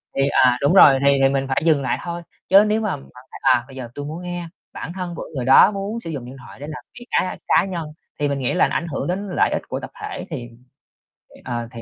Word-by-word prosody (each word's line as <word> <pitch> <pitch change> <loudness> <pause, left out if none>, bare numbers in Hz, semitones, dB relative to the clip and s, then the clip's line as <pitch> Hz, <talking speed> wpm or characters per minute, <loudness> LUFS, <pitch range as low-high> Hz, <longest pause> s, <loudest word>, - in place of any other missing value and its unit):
thì, 135 - +1
à 125 -2 +4
đúng 140 +6 +3
rồi, 140 -8 +8
thì 140 - +2 0.2
thì 135 - +5
mình 135 0 0
phải 135 +2 0
dừng 155 -4 +4
lại 130 - -1
thôi. 170 0 -4 0.3
Chứ 195 +2 +8
nếu 215 +1 +1
mà 210 -6 -1
bạn 135 - -14 0.3
thấy, - - -10
à, 125 -2 +4
bây 135 - -13
giờ 125 -3 -7
tui 145 0 -5
muốn 160 +4 -6
nghe, 175 -1 -5 0.3
bản 165 - -6
thân 180 -2 -5
của - - -7
người 125 -2 -2
đó 135 +9 +7
muốn 200 +3 -4
sử 165 - -6
dụng 135 -6 -5
điện 130 +2 -10
thoại 130 - -13
để 145 - -7
làm 150 - -8 0.2
việc 240 - -11
cá 185 - 0
cá 185 - +4
nhân, 175 -4 -4 0.3
thì 145 - +1
mình 140 -1 -2
nghĩ 130 - -1
là 180 - +3
nó - - -4
ảnh 170 - -1
hưởng 140 -2 -3
đến 195 +3 -2
lợi - - +2
ích - - -1
g - - -25
của - - -3
tập - - -9
thể 420 -1 -5
thì, 120 -7 -6 0.9
ờ, 120 -2 -4
thì 115 - -9
150 Hz, 280 wpm, -21 LUFS, 135-180 Hz, 0.9 s, rồi